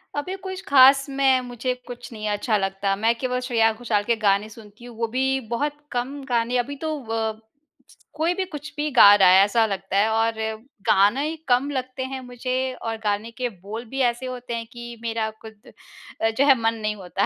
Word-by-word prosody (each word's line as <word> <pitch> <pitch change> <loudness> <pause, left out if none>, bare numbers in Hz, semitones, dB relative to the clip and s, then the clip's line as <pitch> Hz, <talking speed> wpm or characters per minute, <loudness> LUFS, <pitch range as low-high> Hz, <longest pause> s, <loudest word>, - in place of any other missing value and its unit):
अभी 365 +6 -3
कुछ 375 0 -5
ख़ास 275 0 +7
में, 270 -1 +3
मुझे 245 +1 -2
कुछ 245 0 -9
नहीं 215 -1 -5
अच्छा 210 +1 0
लगता, 195 0 -1
मैं 225 +3 +2
केवल 250 -1 -1
श्रेया 225 -3 +3
घोषाल 220 -3 -1
के 235 +2 +1
गाने 205 -1 +1
सुनती 220 +1 -14
हूँ। 240 -2 -11
वो 230 0 -1
भी 265 +1 +1
बहुत 290 +5 -1 0.2
कम 270 +3 -3
गाने 240 +1 +1
अभी 260 +4 -2
तो 310 - -2
अ, 220 -1 -2 0.8
कोई 325 +3 +1
भी 380 +1 -2
कुछ 300 -4 -8
भी 300 +1 -1
गा 215 -6 +8
रहा 190 -3 +6
है 190 +2 +7
ऐसा 225 +2 +2
लगता 195 -1 -3
है 210 +2 +3
और 225 +1 +1 0.6
गाने 210 +9 +4
ही 320 - -3
कम 255 +2 +2
लगते 260 -1 -4
हैं 260 0 -5
मुझे 250 0 -5 0.3
और 225 -1 -3
गाने 210 +2 -1
के 245 +2 -3
बोल 210 +4 -8
भी 270 - -5
ऐसे 240 +1 0
होते 250 -1 -6
हैं 230 0 -4
कि 240 0 -9
मेरा 225 -1 -2
ख़ुद 220 -1 -13 0.5
अ, 225 - +3
जो 260 +5 +1
है 275 - +7
मन 225 0 +2
नहीं 215 0 -1
होता 190 0 -2
235 Hz, 205 wpm, -23 LUFS, 215-260 Hz, 0.8 s, गा